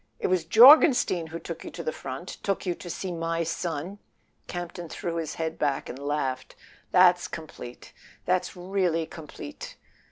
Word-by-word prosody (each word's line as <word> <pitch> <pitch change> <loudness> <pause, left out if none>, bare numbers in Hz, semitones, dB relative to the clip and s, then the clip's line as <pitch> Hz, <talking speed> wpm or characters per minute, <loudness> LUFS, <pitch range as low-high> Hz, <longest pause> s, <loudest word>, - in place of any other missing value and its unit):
It - - -5
was 180 -3 +1
Jorgenstein 235 - +7
who 160 +1 -6
took 170 -1 -7
you - - -7
to 170 - -7
the 155 - -1
front? 135 +6 -7
Took 195 0 -2
you 180 - 0
to 175 - -10
see 185 +2 -4
my 165 0 -1
son?" 165 +3 -4 0.5
Campton 175 -1 -6
threw 170 +1 -4
his 160 -2 -3
head 160 -1 -3
back 140 -2 -1
and 130 - -7
laughed. 140 -3 -3 0.3
"That's 180 -1 +5
complete—that's 165 +5 -5
really 180 -3 0
complete!" 295 - -9
170 Hz, 155 wpm, -27 LUFS, 160-185 Hz, 0.5 s, Jorgenstein